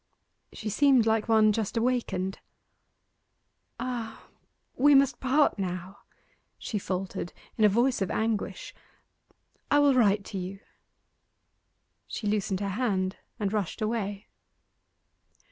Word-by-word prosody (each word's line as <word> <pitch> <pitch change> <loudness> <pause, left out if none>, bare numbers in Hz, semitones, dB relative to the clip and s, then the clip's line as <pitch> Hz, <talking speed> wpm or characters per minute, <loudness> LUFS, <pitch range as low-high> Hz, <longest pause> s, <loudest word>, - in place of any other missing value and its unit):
She 220 - -7
seemed 260 +1 +4
like 220 0 +1
one 215 -1 +5
just 215 +1 -2
awakened. 230 -6 -1 1.4
'Ah 235 -3 -5 0.5
we 285 +2 +5
must 275 0 +4
part 265 -2 +2
now!' 185 0 -4 0.6
she 210 - -3
faltered, 185 -2 -4 0.2
in 215 - +3
a - - +7
voice 240 +3 +2
of 195 - 0
anguish. 225 - -2 1.0
'I 290 - +4
will 290 -1 +5
write 210 -5 +3
to 195 - -5
you.' 185 +2 -6 1.5
She 220 - -6
loosened 205 -2 0
her 200 - -1
hand 195 -3 -1 0.2
and 205 -1 -1
rushed 205 -2 -2
away. 215 -2 -2
215 Hz, 115 wpm, -28 LUFS, 195-245 Hz, 1.5 s, a